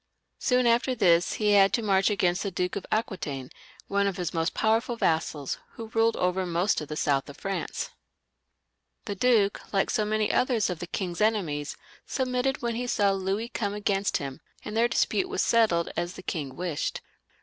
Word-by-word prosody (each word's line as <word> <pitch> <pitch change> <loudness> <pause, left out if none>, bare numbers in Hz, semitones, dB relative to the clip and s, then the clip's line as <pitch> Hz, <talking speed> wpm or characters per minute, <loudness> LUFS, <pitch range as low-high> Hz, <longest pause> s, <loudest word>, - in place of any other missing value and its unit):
Soon 250 -1 +2
after 240 +2 +3
this 175 -6 +3
they 210 -1 +2
had 195 -1 +6
to 235 - +1
march 195 -1 +3
against 180 -3 +1
the 200 - -1
Duke 180 0 -2
of 200 - -5
Aquitaine, 155 - -2 0.4
one 200 0 +1
of 195 - -2
his 175 -3 -3
most 165 0 -1
powerful 225 +2 +1
vassals, 160 - -1
who 225 -1 -8
ruled 225 0 +2
over 180 +1 +1
most 175 +1 +1
of 150 - -6
the 150 - -5
south 140 -2 0
of 145 - -10
Franca 195 0 -3 1.1
The 205 - -3
duke, 205 -1 +2
like 195 -1 +1
so 215 - +1
many 215 0 +1
others 230 -7 +2
of 175 - -5
the 175 - -5
king's 180 0 -3
enemies, 170 -10 0 0.3
submitted 255 0 -1
when 235 -1 0
he 245 +2 -3
saw 205 -4 +2
Louis 195 +4 -1
come 205 -4 -2
against 200 -1 0
him, 135 -2 -6 0.2
and 210 - -5
their 230 +1 +4
dispute 370 +9 +1
was 400 - 0
settled 215 -8 +3
as 175 +1 -2
the - - -10
king 145 -8 -4
wished. 175 -3 -3
200 Hz, 185 wpm, -27 LUFS, 175-225 Hz, 1.1 s, had